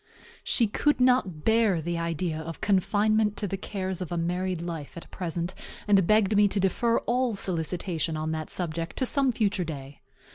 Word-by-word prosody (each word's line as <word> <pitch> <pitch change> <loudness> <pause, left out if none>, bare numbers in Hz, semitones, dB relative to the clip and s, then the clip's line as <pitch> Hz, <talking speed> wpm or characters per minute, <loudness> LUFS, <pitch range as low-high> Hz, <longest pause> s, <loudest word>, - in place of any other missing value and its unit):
She 235 - +3
could 295 +8 +1
not 250 -11 +2
bear 220 -5 +3
the 170 +1 -2
idea 165 -1 -2
of 165 +1 -7
confinement 210 +2 +2
to 205 - -2
the 195 - -2
cares 190 -1 -4
of 180 - -5
a 175 - -1
married 180 +1 -1
life 165 -3 -6
at 170 - -10
present, 175 0 -3 0.3
and 195 -4 +4
begged 215 -1 +4
me 205 0 +6
to 200 0 -1
defer 230 +5 +2
all 245 -1 0
solicitation 170 -3 -2
on 155 +1 -2
that 155 -1 -4
subject 165 -1 -3
to 260 - +1
some 270 0 +2
future 210 -5 0
day. 140 -4 -8
185 Hz, 180 wpm, -27 LUFS, 165-210 Hz, 0.3 s, me